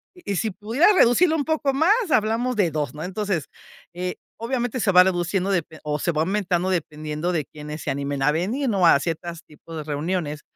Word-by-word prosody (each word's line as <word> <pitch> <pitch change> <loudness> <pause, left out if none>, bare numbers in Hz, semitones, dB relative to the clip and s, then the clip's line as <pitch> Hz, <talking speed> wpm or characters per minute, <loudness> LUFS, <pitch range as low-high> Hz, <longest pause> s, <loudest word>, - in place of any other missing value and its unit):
Y 205 - -4
si 220 +3 -1
pudieras 230 - +3
reducirlo 320 +5 +5
un 290 - 0
poco 310 -3 0
más, 320 +8 +3 0.2
hablamos 230 +4 +1
de 195 -5 +2
2, 150 -2 -3
¿no? 150 - -8
Entonces, 190 -4 -2 0.5
eh, 180 0 -3 0.2
obviamente 245 +1 -2
se 205 - +2
va 180 0 +8
reduciendo 185 +1 0
depe 165 -4 -2
o 150 0 -1
se 170 +4 0
va 155 0 0
aumentando 185 -1 0
dependiendo 155 -1 -2
de 155 -5 -1
quiénes 150 0 -8
se - - -4
animen 140 0 -2
a 150 +2 +4
venir, 220 - -1
¿no?, 195 -5 +2
a 150 -4 +6
ciertas 170 +1 -4
tipos 155 +2 -13
de 155 - -4
reuniones. 150 +1 -3
180 Hz, 200 wpm, -23 LUFS, 155-220 Hz, 0.5 s, va